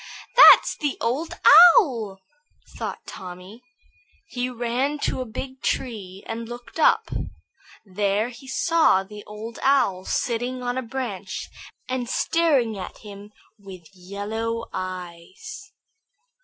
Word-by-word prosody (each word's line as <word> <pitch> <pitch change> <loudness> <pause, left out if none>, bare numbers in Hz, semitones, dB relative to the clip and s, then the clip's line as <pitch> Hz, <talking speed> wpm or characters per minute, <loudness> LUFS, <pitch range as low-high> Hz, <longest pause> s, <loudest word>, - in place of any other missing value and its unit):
"That's - - +8
the 290 -2 -2
Old 265 +8 -2 0.4
Owl," 230 - 0 0.6
thought - - -6
Tommy. 185 +5 -10 0.7
He 250 0 -3
ran 250 +4 -2
to - - -1
a - - -4
big 260 +4 -8
tree 200 -7 -4
and 230 0 -6
looked 240 +6 -9
up. - - +3 0.7
There 205 +3 -1
he 250 +2 -13
saw 325 - +2
the 210 +1 -11
Old 215 +2 -9
Owl, 200 -9 +2
sitting 245 +1 -2
on 245 0 -2
a 260 - -1
branch 225 -6 -6 0.4
and 255 -2 -3
staring 275 -11 +1
at 185 - -8
him 205 0 -12 0.3
with 190 -3 -12
yellow 215 +5 -4
eyes. 185 - -8
230 Hz, 115 wpm, -23 LUFS, 195-255 Hz, 0.7 s, That's